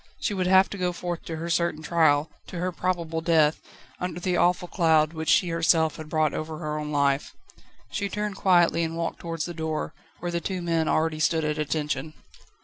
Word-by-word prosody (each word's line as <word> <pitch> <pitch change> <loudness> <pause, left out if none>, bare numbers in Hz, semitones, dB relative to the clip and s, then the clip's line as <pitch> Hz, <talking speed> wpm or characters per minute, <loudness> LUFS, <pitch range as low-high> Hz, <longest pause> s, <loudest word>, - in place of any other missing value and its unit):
She - - -1
would 185 -2 0
have 190 +1 +6
to 200 - -6
go 180 -1 0
forth 175 -1 -5
to 165 - -4
her 165 +2 -5
certain 170 -2 0
trial, 155 -2 +3 0.2
to 180 - -7
her 180 +2 -1
probable 170 -2 -2
death, 160 -2 +3 0.4
under 180 -1 -3
the 180 0 0
awful 180 0 +2
cloud, 160 -3 +3
which 160 -1 -3
she 180 - +4
herself 165 -1 +2
had 155 -1 -8
brought 155 -1 +1
over 155 0 -4
her 150 -2 -3
own 150 0 -4
life. 140 -1 +1 0.6
She 200 -1 -2
turned 210 0 -3
quietly, 175 -3 +3
and 165 0 -3
walked 170 0 -3
towards 165 -2 -4
the 175 - -5
door, 160 -1 -3 0.3
where 175 0 -3
the 170 0 -2
two 185 0 -3
men 165 -2 +1
already 155 0 +1
stood 160 0 +2
at 150 0 -1
attention. 150 0 -2
165 Hz, 205 wpm, -26 LUFS, 155-175 Hz, 0.6 s, have